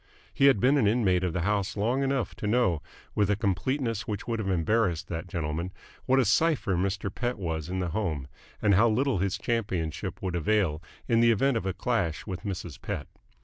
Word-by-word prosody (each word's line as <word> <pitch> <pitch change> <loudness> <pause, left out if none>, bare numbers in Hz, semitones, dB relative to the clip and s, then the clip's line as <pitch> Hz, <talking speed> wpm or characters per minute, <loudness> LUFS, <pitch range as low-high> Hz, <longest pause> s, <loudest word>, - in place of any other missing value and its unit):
He 140 - +4
had 135 -7 +5
been 135 +5 +4
an 110 - +3
inmate 100 -5 +2
of 90 - 0
the 90 - -2
house 100 +2 0
long 120 +6 +1
enough 135 -4 0
to 105 - -3
know, 105 -8 +2 0.3
with 105 -2 +2
a 105 - +3
completeness 115 +4 -1
which 105 -1 -4
would 115 -1 -1
have 100 -3 -2
embarrassed 95 0 +1
that 85 +1 -4
gentleman, 85 0 -3 0.4
what 130 - +4
a 135 - +4
cipher 155 - +2
Mr. 95 +1 -1
Pett 125 0 -2
was 80 -4 -3
in 95 - -2
the 90 -2 -1
home 80 -8 -2 0.4
and 100 - +5
how 110 +5 +5
little 125 -1 +1
his 95 0 0
championship 100 -7 -2
would 90 -2 -3
avail 85 -2 +1 0.3
in 115 -2 +3
the 115 0 +5
event 135 +4 +2
of 110 -4 -1
a 95 - 0
clash 95 -5 -1
with 95 -4 -5
Mrs. 95 -7 -6
Pett. - - -4
100 Hz, 205 wpm, -28 LUFS, 90-115 Hz, 0.4 s, had